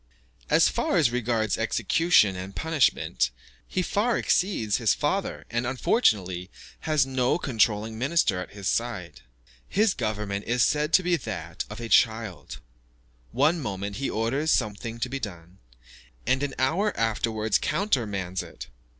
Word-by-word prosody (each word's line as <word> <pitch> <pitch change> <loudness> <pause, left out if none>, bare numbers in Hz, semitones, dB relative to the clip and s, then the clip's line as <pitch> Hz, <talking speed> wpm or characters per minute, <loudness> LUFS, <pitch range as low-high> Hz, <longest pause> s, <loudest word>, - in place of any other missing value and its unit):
As - - +5
far - - 0
as 130 -7 +3
regards 115 -4 0
execution 165 - +3
and 95 +1 -7
punishment, 155 - +1 0.4
he 185 - -1
far 225 +6 +1
exceeds 145 - +1
his 115 -4 +2
father; 190 +7 -2
and, 120 +1 -1
unfortunately, 100 - +1 0.4
has 150 -4 +3
no 130 0 +1
controlling 110 -6 0
minister 135 - +1
at 90 - -6
his 100 -2 -5
side. 115 -7 -2 0.5
His 210 0 +2
government 105 -3 -3
is 120 0 +2
said 150 +1 +1
to 185 - +6
be 175 -1 +2
that 85 - -5
of 105 +2 -8
a 115 - -5
child; 110 - +1 0.7
one 150 +8 +2
moment 100 -5 -4
he 135 - -2
orders 130 +8 -1
something 115 -1 -1
to - - 0
be 135 +2 -4
done, 90 -4 -8 0.7
and 130 - +1
an 145 -2 -2
hour 170 +11 +1
afterwards 110 -1 0
countermands 105 - -1
it. - - -10
115 Hz, 140 wpm, -26 LUFS, 105-145 Hz, 0.7 s, to